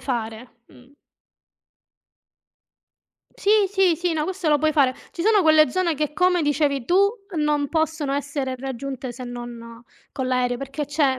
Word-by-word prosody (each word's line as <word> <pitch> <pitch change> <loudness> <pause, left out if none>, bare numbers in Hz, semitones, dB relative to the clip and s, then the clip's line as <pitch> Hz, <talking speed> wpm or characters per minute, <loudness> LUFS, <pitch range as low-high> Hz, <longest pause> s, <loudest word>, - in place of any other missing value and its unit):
fare, 235 -1 -5
mh. 255 +3 -20 2.4
Sì, 400 - -1 0.2
sì, 380 -4 +2
sì, 350 0 -1
no 310 -1 -1
questo 375 -3 -3
lo 295 -1 +4
puoi 310 +1 +1
fare. 270 -4 +3 0.2
Ci 340 - -5
sono 425 -2 +4
quelle 310 -2 +5
zone 360 -3 0
che, 300 0 -2
come 360 0 +2
dicevi 290 -3 0
tu, 385 +7 +4 0.3
non 295 -1 +1
possono 315 -2 -1
essere 280 -2 -2
raggiunte 265 0 -5
se 250 +1 -8
non 240 -1 -9 0.3
con 260 -2 -3
l'aereo, 250 -1 +1
perché 275 +3 -5
c'è 280 -2 +1
285 Hz, 150 wpm, -23 LUFS, 255-320 Hz, 2.4 s, quelle